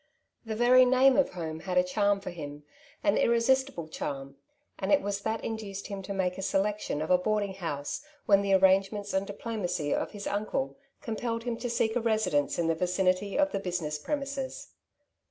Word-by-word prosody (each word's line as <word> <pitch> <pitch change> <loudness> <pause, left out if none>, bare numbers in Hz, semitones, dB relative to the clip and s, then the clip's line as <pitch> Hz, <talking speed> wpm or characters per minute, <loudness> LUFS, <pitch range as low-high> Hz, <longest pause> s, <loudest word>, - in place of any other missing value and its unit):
The 220 - -2
very 245 +3 +6
name 260 +1 +5
of 280 - +2
home 160 -3 -5
had 180 +2 -3
a 180 - +6
charm 200 +2 +1
for 190 - -5
him, 145 -3 -8 0.4
an 200 0 +3
irri 235 0 +3
sistible 265 - +1
charm, 135 -2 -5 0.4
and 190 0 -1
it - - +6
was 200 0 -2
that 220 +2 -2
induced 210 -3 -5
him 200 -1 -4
to 195 - -7
make 190 -1 -1
a - - -3
selection 195 -5 0
of 160 - -3
a 180 - +6
boarding 205 0 0
house, 155 -6 -4 0.2
when 200 -1 +5
the 200 -1 +1
arrange 190 +1 +4
ments 205 -1 -5
and 190 +1 0
diplomacy 185 -8 -2
of - - -1
his 205 -2 -8
uncle 215 +7 -2 0.3
compelled 230 0 -3
him 240 -1 -2
to 245 - -4
seek 230 -1 +1
a 245 - +1
residence 215 -11 +1
in 170 - +1
the 165 - +2
vicinity 185 +3 0
of 290 0 +3
the 195 - -1
business 175 -5 -3
premises. 275 - -4
200 Hz, 195 wpm, -29 LUFS, 180-230 Hz, 0.4 s, very